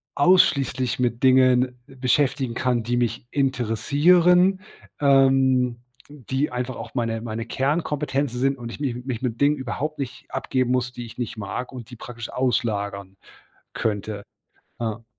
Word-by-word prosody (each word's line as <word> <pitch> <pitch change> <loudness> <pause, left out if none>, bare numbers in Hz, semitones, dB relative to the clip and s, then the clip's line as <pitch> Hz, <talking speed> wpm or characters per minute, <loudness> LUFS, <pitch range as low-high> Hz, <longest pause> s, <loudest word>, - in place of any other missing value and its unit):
ausschließlich 140 -7 +3
mit 120 0 -1
Dingen 130 -1 +4
beschäftigen 130 -1 0
kann, 120 -1 0
die 120 +1 -1
mich 120 0 -1
interessieren. 165 - +3 0.4
Ähm, 135 -3 +4 0.3
die 135 0 -3
einfach 125 +1 -3
auch - - -8
meine 115 -2 -1
meine 115 0 -4
Kernkompetenzen 145 -1 -1
sind 135 +1 +1
und 120 -1 -7
ich - - -9
nicht 125 -4 -3
mich 125 -3 -4
mit 120 -3 -3
Dingen 145 +1 +4
überhaupt 145 +3 -4
nicht 130 -3 -6
abgeben 130 -1 -1
muss, 125 -1 0
die 120 -1 -7
ich 115 - -12
nicht 120 -2 -4
mag 125 +5 -5
und 125 -3 -9
die 125 - -10
praktisch 120 0 -8
auslagern 100 -6 -1 0.6
könnte, 105 -1 -3 0.6
ja. 115 0 -3
125 Hz, 140 wpm, -23 LUFS, 120-135 Hz, 0.6 s, Dingen